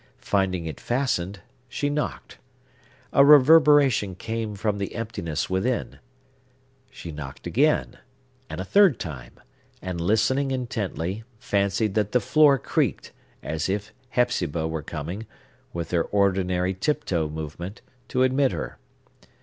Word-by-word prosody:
Finding 95 -4 0
it 80 -4 -6
fastened, 120 -7 -1 0.3
she 145 - -2
knocked. 145 +1 -4 0.7
A 140 - +7
reverberation 145 - +6
came 110 +1 -4
from 100 0 -1
the 100 - -4
emptiness 95 -9 -3
within. 110 +7 -1 0.9
She 85 - -9
knocked 75 -3 -8
again, 150 +5 +1 0.5
and - - -6
a 95 - -3
third 195 - +5
time; 65 -8 -8 0.4
and, 90 -2 -4
listening 130 +9 +2
intently, 110 -6 -3
fancied 100 0 0
that 105 -1 0
the 125 - +5
floor 150 0 +5
creaked, - - -1 0.3
as 80 +3 -2
if 100 +1 -3 0.2
Hepzibah 85 - 0
were 80 -1 -3
coming, 85 +8 -6 0.4
with 85 -1 -5
her 85 -2 +1
ordinary 95 -2 +1
tiptoe 95 - -1
movement, 80 +6 -7 0.3
to 130 - +1
admit 130 +1 +2
her. - - -5
100 Hz, 125 wpm, -25 LUFS, 85-125 Hz, 0.9 s, A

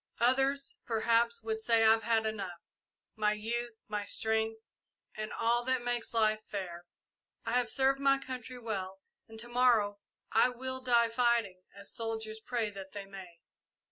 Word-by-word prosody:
Others, 270 +3 +2
perhaps, 230 0 +2
would 220 0 -2
say 230 0 +3
I 220 - +7
have 225 0 +4
had 225 -1 +2
enough 200 -5 -3 0.6
my 210 -1 +2
youth, 235 +2 -3
my 210 -1 -2
strength, 220 +1 0 0.6
and 215 0 -4
all 235 +1 +1
that 260 -1 +1
makes 245 -1 -2
life 215 -1 +3
fair. 175 -3 -5 0.6
I 225 - -2
have 245 -1 +2
served 270 +3 +3
my 275 0 +4
country 255 -2 -7
well 195 -5 -4 0.3
and 225 0 -10
to 235 - -5
morrow 240 -5 +3 0.3
I 235 +3 +4 0.3
die 235 -2 +4
fighting, 230 -6 +1
as 200 0 -6
soldiers 220 -1 -4
pray 225 -1 -2
that 195 -1 -9
they 200 -1 -6
may. 190 -4 -11
225 Hz, 155 wpm, -32 LUFS, 210-240 Hz, 0.6 s, I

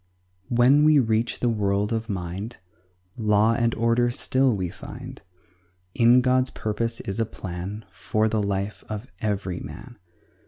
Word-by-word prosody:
When 125 +5 +5
we 155 0 +6
reach 115 -3 +1
the 125 - +2
world 105 -1 0
of 115 0 -3
mind 95 +4 -4 0.6
Law 105 0 +3
and 115 0 +1
order 115 +1 +2
still 130 +2 +1
we 95 -2 -2
find; - - -10 0.7
In 120 +2 +5
God's 130 0 +3
purpose 115 +2 -3
is 100 +2 -4
a - - +3
plan 95 +1 -6
For 110 0 0
the 110 -1 0
life 100 0 -2
of 110 +1 -5
every 100 -4 -2
man. 120 -3 -10
110 Hz, 145 wpm, -25 LUFS, 100-120 Hz, 0.7 s, we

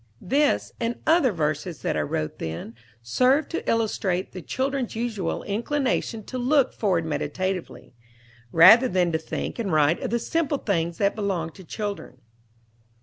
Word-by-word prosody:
This, 290 +2 +1
and 235 0 -2
other 315 -6 +4
verses 155 0 -2
that - - 0
I 75 - +1
wrote 75 +1 -3
then, 80 +7 -5 0.3
serve 255 - +2
to 335 - -3
illustrate 200 -5 0
the 185 - -7
child's 265 +3 -2
usual 220 -6 -2
inclination 235 0 -1
to 255 +4 -6
look 265 +1 +2
forward 180 -6 0
meditatively, 180 +2 -3 0.6
rather 215 +10 +8
than 180 -5 +1
to 160 - 0
think 160 - -5
and 205 -5 -2
write 155 +1 +3
of - - -2
the 235 - +1
simple 300 +3 -1
things 170 -8 -1
that 200 0 +1
belong 190 -6 -2
to 190 - -13
children. 205 - -5
200 Hz, 150 wpm, -25 LUFS, 165-250 Hz, 0.6 s, rather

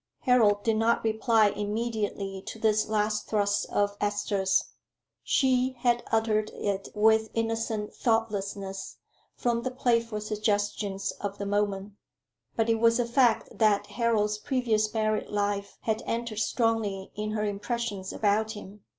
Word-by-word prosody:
Harold 220 -6 +4
did 225 -1 +2
not 230 +1 +2
reply 220 -1 +3
immediately 205 -2 -3
to - - -7
this 215 -1 +2
last 215 0 0
thrust 205 -1 +1
of 205 0 0
Esther's. 205 -2 +1 0.6
She 260 -1 +2
had 240 -1 +2
uttered 220 -1 +1
it 195 -1 -2
with 220 +1 +4
innocent 225 -2 -2
thoughtlessness 200 -4 -2 0.4
from 235 -1 0
the 255 - -2
playful 235 -3 0
suggestions 205 -2 -1
of 200 0 -4
the 200 - -4
moment; 205 0 -1 0.6
but 225 -1 +1
it 225 -1 +2
was 230 +1 +4
a 245 - +2
fact 235 -1 +3
that 215 -3 +3
Harold's 215 -3 0
previous 220 -3 0
married 215 -1 0
life 205 -1 -2
had 220 -1 -1
entered 230 -2 -2
strongly 220 -4 0
in 215 0 -3
her 215 -1 -1
impressions 205 -1 -3
about 215 +1 +1
him. 205 -1 -11
215 Hz, 135 wpm, -28 LUFS, 205-230 Hz, 0.6 s, Harold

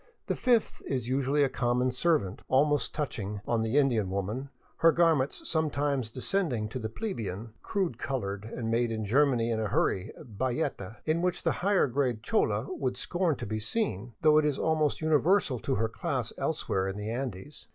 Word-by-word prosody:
The - - -1
fifth 240 -3 +1
is 125 -4 -2
usually 135 +3 +2
a - - +4
com 120 -2 0
mon 125 +1 +2
servant, 125 - +1
almost 145 +2 +2
touching 105 -9 -3
on 115 -1 +1
the 110 +5 0
Indian 120 -9 +3
woman, 105 +8 -3 0.3
her 165 - +6
garments 160 -5 +2
sometimes 145 -6 0
descending 130 - -1
to 130 - -5
the 110 -2 -3
plebeian, 110 - -5
crude 180 - -2
colored, 110 -5 -3
made 115 +1 +1
in 110 -1 -2
Ger 140 +8 +4
many 120 -3 0
and 110 - 0
in 110 - 0
a - - -6
hurry 95 +2 0
bayeta 120 -4 -3
in 160 +2 +1
which 180 0 -1
the - - +2
higher 200 +1 +3
grade 125 -4 -1
chola 105 -1 0
would 125 -2 -2
scorn 175 +3 0
to - - -6
be 110 +1 -3
seen, 115 - -1
though 155 0 +6
it 155 - +1
is 150 -2 +1
almost 155 -2 +1
universal 155 - +3
to - - -1
her 110 +3 +1
class 110 - -3
elsewhere 95 0 -1
in 95 +1 -4
the 105 +1 -4
Andes. 125 +1 -5
130 Hz, 185 wpm, -29 LUFS, 110-150 Hz, 0.3 s, her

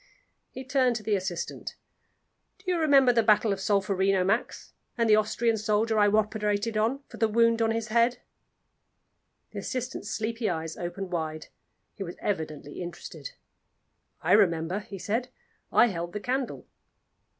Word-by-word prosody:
He 260 - -8
turned 255 -2 +2
to 220 - -4
the 210 -1 +1
assistant. 185 -3 -4 0.8
"Do 370 0 -3
you 350 - +1
remember 275 -5 +5
the 230 - +4
battle 215 -1 +3
of 195 - -5
Solferino, 195 -1 +2
Max 215 +6 -1 0.2
and 230 -1 +2
the 215 - +6
Austrian 220 +2 +1
soldier 215 +1 +1
I 205 - +5
operated 210 +1 0
on 235 +6 0
for - - -12
a 225 - +5
wound 230 +1 +3
on 225 - +3
the 225 0 +1
head?" 235 +2 +2 1.3
The - - -5
assistant's 255 -4 -4
sleepy 225 0 -2
eyes 160 -2 -3
opened 180 +2 -5
wide; 155 -2 -4 0.4
he - - -13
was 175 -2 -5
evidently 155 -5 -4
interested. 175 - -8 0.9
"I - - 0
remember," 175 -2 +3
he 200 -1 -9
said. 230 +7 -2 0.4
"I - - +6
held 175 -6 -3
the 210 - -3
candle." 255 +4 -3
215 Hz, 150 wpm, -27 LUFS, 190-235 Hz, 1.3 s, the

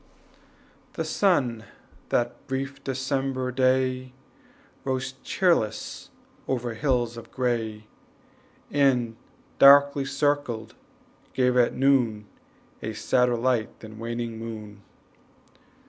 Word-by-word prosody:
The - - -3
sun 130 - +1 0.5
that 120 +3 -1
brief 135 0 -4
December 130 -1 -2
day 130 0 +1 0.7
Rose 130 0 -2
cheerless 110 - 0 0.4
over 120 -2 -2
hills 120 -1 0
of 115 - -10
gray, 115 -4 -2 0.9
And, 125 -5 +2 0.4
darkly 140 0 +7
circled, 135 -5 -1 0.6
gave 125 -1 +2
at 125 -1 +3
noon 125 -6 +2 0.6
A 110 +1 -4
sadder 125 +2 +2
light 120 -2 -1
than 110 0 -10
waning 115 0 -4
moon. 105 -3 -8
125 Hz, 90 wpm, -26 LUFS, 115-135 Hz, 0.9 s, darkly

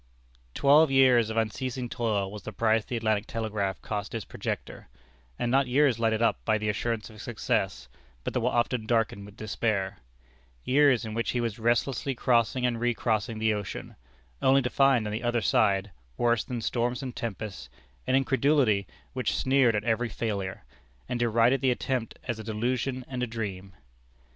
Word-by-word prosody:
Twelve 150 +3 +5
years 130 -4 +5
of 110 - -4
unceasing 125 +3 -2
toil 105 -5 -1
was 105 0 -8
the - - -7
price 110 -1 +2
the 120 0 -4
Atlantic 110 -2 0
Telegraph 105 -4 -2
cost 105 +1 -4
its 110 - -4
projector; - - -5 0.5
and 120 - -1
not 135 0 +3
years 130 -2 +3
lighted 110 0 +1
up 115 - +1
by 110 -1 +2
the 105 0 -2
assurance 110 +1 -2
of 110 0 -11
success, 105 - -2 0.4
but - - -3
that 125 - +1
were 120 - +2
often 120 -2 0
darkened 110 -4 0
with 105 - -15
despair: 105 -2 -2 0.6
years 135 -3 +4
in 110 - -5
which 115 +1 -1
he 125 - 0
was 115 -2 -2
restlessly 120 +4 0
crossing 120 +1 +2
and 120 -2 0
recrossing 115 -2 0
the 110 0 +2
ocean, 105 -3 -6 0.5
only 135 0 +4
to 125 - -2
find 135 -5 +4
on 105 - -3
either 120 +2 0
side, 100 0 +2 0.3
worse 120 -3 +2
than 120 -2 -5
storms 120 +3 -1
and 130 -2 -6
tempests, 100 - -5 0.4
an 130 - +3
incredulity 135 -6 +2 0.3
which 130 -2 -1
sneered 130 -4 +3
at 105 - -1
every 115 +1 0
failure, 100 -4 -3 0.4
and 120 - -2
derided 120 +2 +3
the 135 - +3
attempt 125 -1 -2
as 120 -3 -3
a - - -6
delusion 125 +4 -2
and 125 -2 -4
a 125 - 0
dream. 100 -4 -5
115 Hz, 170 wpm, -28 LUFS, 110-125 Hz, 0.6 s, Twelve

